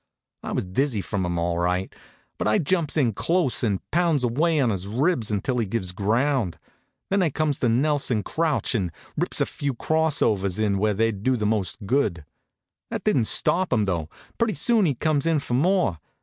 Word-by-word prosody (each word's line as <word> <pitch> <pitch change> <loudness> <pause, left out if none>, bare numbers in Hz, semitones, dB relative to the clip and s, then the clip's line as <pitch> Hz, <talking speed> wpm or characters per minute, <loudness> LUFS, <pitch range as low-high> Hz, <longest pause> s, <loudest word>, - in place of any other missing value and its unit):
I - - -6
was - - -1
dizzy 115 +5 0
from 100 -1 -3
'em 85 0 -2
all 85 0 -1
right; 90 +2 -1 0.5
but - - 0
I 105 - +3
jumps 165 0 0
in 125 -7 +2
close 165 - 0
an' 100 -5 0
pounds 165 -5 +2
away 150 +7 +1
on 125 -5 +2
his 95 -1 -3
ribs 125 - 0
until 110 +4 -1
he 115 - -1
gives 95 -3 -2
ground. 110 - 0 0.5
Then 195 0 +3
I 175 - +2
comes 150 0 -1
the 125 - +2
Nelson 130 -3 +1
crouch, 160 -5 0
and 95 -7 -1 0.2
rips - - -1
a - - +4
few 140 -3 -4
cross 160 +3 +1
overs 95 -3 0
in 105 -3 +1
where 105 0 +1
they'd 110 -1 0
do 130 +3 +1
the 105 - -2
most 105 -2 -1
good. 100 - 0 0.6
That - - -4
didn't 120 - +2
stop 185 +10 +2
him, 110 -5 +2
though. 85 -5 -2 0.3
Pretty 230 -2 +1
soon 225 -6 +3
he 140 - 0
comes 155 +3 0
in 165 -1 +3
for 140 -4 -4
more. 165 - +2
120 Hz, 195 wpm, -24 LUFS, 100-150 Hz, 0.6 s, a